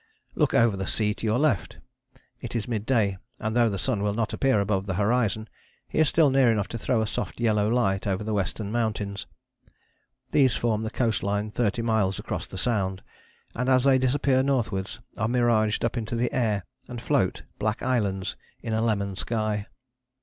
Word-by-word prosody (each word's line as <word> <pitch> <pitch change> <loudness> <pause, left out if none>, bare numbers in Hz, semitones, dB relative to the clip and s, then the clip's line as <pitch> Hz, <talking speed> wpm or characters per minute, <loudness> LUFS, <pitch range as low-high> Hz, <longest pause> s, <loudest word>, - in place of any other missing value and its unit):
Look - - +1
over 115 -3 +4
the 95 -1 -4
sea 105 -1 +1
to 110 - -4
your 110 +2 +2
left. 125 - 0 0.6
It - - -7
is 115 - -2
mid 110 -3 -3
day, 105 -7 +2 0.2
and 110 +1 -3
though 120 -1 +4
the 100 - -2
sun 100 +2 -1
will 105 0 0
not 115 -1 -1
appear 135 -6 +2
above 100 -1 0
the 95 - -1
horizon 110 +1 +1 0.4
he - - -2
is 155 - +5
still 155 -4 +4
near 130 -3 +5
enough 105 -3 0
to 115 - -5
throw 110 0 +1
a - - -1
soft 110 - -4
yellow 105 -3 +2
light 100 -4 +1
over 95 +1 -1
the 110 0 -2
Western 100 +1 -2
Mountains. 105 -4 -2 1.0
These 130 -5 +4
form 110 -2 0
the 110 - -2
coast 115 -3 0
line 105 +1 -1
thirty 115 0 0
miles 110 -5 +1
across - - -4
the 95 - -8
Sound, 95 -2 -1 0.5
and 125 +2 -1
as 130 -1 +4
they 135 -1 +5
disappear 130 0 +2
northwards 115 -7 -1 0.2
are 110 - 0
miraged 115 -3 +2
up 115 - -1
into 115 -1 -3
the 120 +1 0
air 105 -7 0 0.2
and - - -6
float, - - 0 0.2
black 110 +1 -1
islands 100 -7 0 0.3
in 115 - -2
a 110 - +1
lemon 100 -4 0
sky. 110 0 -2
110 Hz, 195 wpm, -26 LUFS, 100-120 Hz, 1.0 s, is